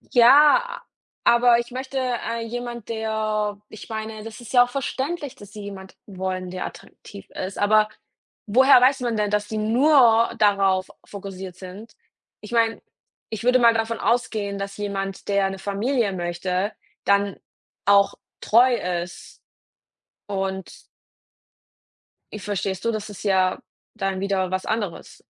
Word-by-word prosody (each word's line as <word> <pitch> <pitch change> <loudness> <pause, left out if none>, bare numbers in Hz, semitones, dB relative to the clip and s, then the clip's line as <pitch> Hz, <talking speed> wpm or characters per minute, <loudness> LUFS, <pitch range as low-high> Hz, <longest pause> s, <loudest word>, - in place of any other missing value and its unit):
Ja, 295 - +6 0.4
aber 235 0 +5
ich 240 0 -4
möchte, 260 +1 -5
äh, 240 -2 -2
jemand, 240 -1 -6
der 215 -2 -2
ich 215 - -11
meine, 220 -1 -5
das 225 +2 -9
ist 240 - -10
ja 245 - +7
auch 245 - -5
verständlich, 275 +2 -3
dass 205 -1 -14
sie 210 -2 -8
jemand 190 -1 -9
wollen, 185 -2 -4
der 185 0 -4
attraktiv 200 -1 -13
ist. 190 +1 -5
Aber 215 +1 +3 0.6
woher 255 +5 +6
weiß 260 +2 +4
man 235 -3 -1
denn, 210 -1 0
dass 210 0 0
die 220 - -4
nur 235 0 +4
darauf 195 -2 +2
fokussiert 190 -2 -8
sind? 190 +5 -11 0.5
Ich 210 - -11
meine, 230 -1 +2 0.5
ich 220 -2 -5
würde 250 +1 +5
mal 235 -2 +5
davon 225 0 -1
ausgehen, 210 -3 -1
dass 195 0 -5
jemand, 195 -2 -4
der 200 -1 +2
'ne 195 - -6
Familie 205 +3 -1
möchte, 180 +3 -2 0.3
dann 200 -1 +2 0.5
auch 200 0 +5 0.3
treu 245 +4 +5 0.3
ist 175 0 -11 0.9
und 190 -2 -5 1.5
Ich 210 - -7
verstehst 195 -2 -3
du? 230 - +1
Das 215 -1 -5
ist 200 - -10
ja 190 -2 +2 0.4
dann 195 -3 -2
wieder 195 -2 0
was 185 0 -2
anderes. 215 -5 -4
210 Hz, 140 wpm, -23 LUFS, 195-235 Hz, 1.5 s, ja